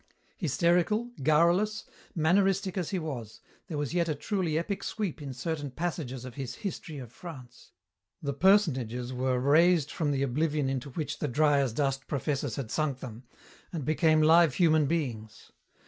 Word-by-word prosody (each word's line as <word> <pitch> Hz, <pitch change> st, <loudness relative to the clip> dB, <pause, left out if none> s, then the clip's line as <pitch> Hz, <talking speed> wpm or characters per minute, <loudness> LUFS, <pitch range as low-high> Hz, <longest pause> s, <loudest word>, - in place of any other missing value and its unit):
Hysterical, 175 Hz, -, +1 dB
garrulous, 170 Hz, +9 st, +3 dB, 0.3 s
manneristic 190 Hz, +3 st, +2 dB
as 180 Hz, -5 st, -2 dB
he 195 Hz, -, -1 dB
was, 130 Hz, -, -6 dB, 0.3 s
there 160 Hz, -5 st, -4 dB
was 145 Hz, +1 st, -2 dB
yet 170 Hz, -1 st, +1 dB
a 155 Hz, -, 0 dB
truly 170 Hz, 0 st, -1 dB
epic 195 Hz, +4 st, -2 dB
sweep 195 Hz, -8 st, -3 dB
in 140 Hz, -2 st, -5 dB
certain 145 Hz, +3 st, -4 dB
passages 135 Hz, -4 st, -4 dB
of 125 Hz, -, -8 dB
his 130 Hz, -2 st, -5 dB
History 170 Hz, -6 st, -6 dB
of 125 Hz, -4 st, -8 dB
France. 130 Hz, -7 st, -11 dB, 0.5 s
The 140 Hz, -5 st, -3 dB
personages 130 Hz, -, +2 dB
were 130 Hz, 0 st, 0 dB
raised 155 Hz, +3 st, +4 dB
from 155 Hz, -4 st, -1 dB
the 140 Hz, -1 st, 0 dB
oblivion 145 Hz, +1 st, 0 dB
into 135 Hz, +1 st, -3 dB
which 150 Hz, +3 st, -4 dB
the 150 Hz, -, -1 dB
dry 145 Hz, +2 st, +3 dB
as 135 Hz, -3 st, +1 dB
dust 135 Hz, +2 st, -1 dB
professors 140 Hz, -3 st, -2 dB
had 130 Hz, -6 st, -5 dB
sunk 150 Hz, -4 st, -1 dB
them, 120 Hz, -1 st, -9 dB, 0.5 s
and 160 Hz, -7 st, -4 dB
became 155 Hz, 0 st, +3 dB
live 160 Hz, -2 st, +5 dB
human 155 Hz, -4 st, +4 dB
beings. 120 Hz, -9 st, -4 dB
150 Hz, 160 wpm, -29 LUFS, 130-170 Hz, 0.5 s, live